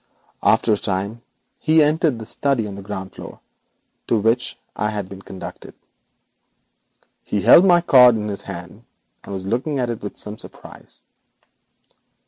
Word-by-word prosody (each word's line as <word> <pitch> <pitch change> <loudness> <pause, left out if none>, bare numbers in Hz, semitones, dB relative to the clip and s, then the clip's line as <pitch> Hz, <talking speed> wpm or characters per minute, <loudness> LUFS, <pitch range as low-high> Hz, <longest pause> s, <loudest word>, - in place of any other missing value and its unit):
After 110 - +3
a - - +1
time 100 +3 -3 0.4
he 155 0 +4
entered 150 -3 +1
the 110 - -8
study 125 0 0
on 100 - -7
the 100 - -8
ground 95 -1 -7
floor, - - -10 0.7
to 115 - +2
which 115 +3 0 0.2
I 105 - -1
had 105 -3 -4
been 95 0 -10
conducted. 95 -1 -10 1.5
He 105 - -2
held 175 - +8
my 175 -2 +5
card 125 -7 +7
in 105 -1 -3
his 100 -1 -4
hand, 95 +4 -9 0.4
and - - -10
was 95 -1 -5
looking 125 +8 -1
at 125 -2 -1
it 115 - -6
with 105 - -7
some 105 +1 -5
surprise. - - -13
110 Hz, 155 wpm, -21 LUFS, 100-125 Hz, 1.5 s, held